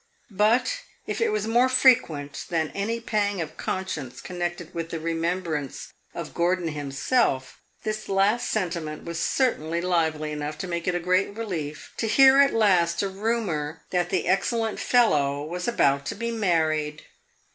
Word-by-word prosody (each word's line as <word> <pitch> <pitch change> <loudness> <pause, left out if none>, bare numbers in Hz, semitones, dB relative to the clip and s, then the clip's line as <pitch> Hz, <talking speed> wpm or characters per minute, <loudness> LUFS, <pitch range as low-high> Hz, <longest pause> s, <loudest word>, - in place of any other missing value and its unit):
But 225 - +2 0.3
if - - -3
it 460 - +3
was 430 0 -1
more 240 +3 +3
frequent 230 - +3
than 160 -3 0
any 225 +4 -2
pang 205 -4 -1
of 155 -2 -4
conscience 160 -9 -4
connected 175 -2 -5
with 165 -1 -4
the 165 - -4
remembrance 165 -3 -3 0.2
of - - -6
Gordon 175 0 +1
himself, 145 - 0 0.2
this 215 0 -4
last 200 +4 +2
sentiment 170 -7 -2
was 170 -1 -5
certainly 170 - 0
lively 160 -4 0
enough 150 0 -4
to 185 - -5
make 170 -1 -3
it 180 - +1
a - - +1
great 185 +4 +1
relief 165 -10 -5
to 225 - -1
hear 270 +4 +7
at 280 0 +6
last 180 -5 +3
a - - +1
rumor 190 -8 -2
that 175 -1 +1
the 185 - -1
excellent 220 +3 0
fellow 145 - +2
was 180 +3 -4
about 140 -11 +2
to - - -3
be 235 +3 -3
married. 155 -7 0
175 Hz, 155 wpm, -25 LUFS, 155-215 Hz, 0.3 s, hear